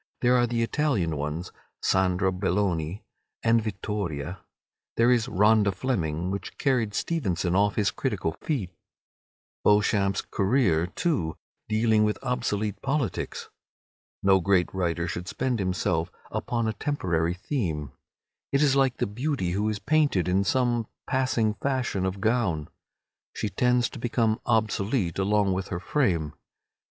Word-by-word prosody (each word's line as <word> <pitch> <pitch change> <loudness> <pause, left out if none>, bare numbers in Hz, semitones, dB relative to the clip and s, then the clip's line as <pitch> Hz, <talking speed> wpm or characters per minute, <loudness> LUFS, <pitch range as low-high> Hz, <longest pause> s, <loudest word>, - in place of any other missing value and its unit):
There 125 0 +4
are 120 -1 +3
the 115 0 0
Italian 115 - 0
ones, 75 +4 -4 0.3
"Sandra 95 0 +2
Belloni," 90 -2 -1 0.4
and 115 0 +4
"Vittoria"; 95 -5 -4 0.6
there 115 +2 +5
is 120 -3 +2
"Rhoda 105 +1 +4
Fleming," 90 -6 -2
which 100 - -5
carried 120 -7 +1
Stevenson 95 - -1
off 100 +1 +3
his 100 -4 +2
critical 80 -2 -2
feet; 120 - -2 0.9
"Beauchamp's 100 -1 +3
Career," 95 -6 +2
too, 95 - -1 0.3
dealing 110 0 +3
with 105 0 +1
obsolete 110 -5 -1
politics. 135 -5 -2 0.7
No 95 -1 +5
great 95 -1 +2
writer 85 -2 -1
should 85 +1 -5
spend 125 +1 -1
himself 90 -2 0 0.2
upon 115 -2 -1
a 110 - 0
temporary 90 - -1
theme. 90 - -3 0.6
It 140 +2 +3
is 140 -2 +4
like 135 -2 +2
the - - 0
beauty 120 - -2
who 105 +4 0
is 105 - -2
painted 135 - +2
in 95 +2 +2
some 120 -1 +1 0.2
passing 130 -5 +1
fashion 120 -7 -1
of 95 +1 -4
gown. 105 -9 0 0.7
She 105 - -2
tends 125 +3 +2
to - - -8
become 115 -2 0
obsolete 105 - +1
along 100 0 +2
with 95 +1 -3
her 85 - -3
frame. 90 - 0
105 Hz, 135 wpm, -26 LUFS, 90-120 Hz, 0.9 s, there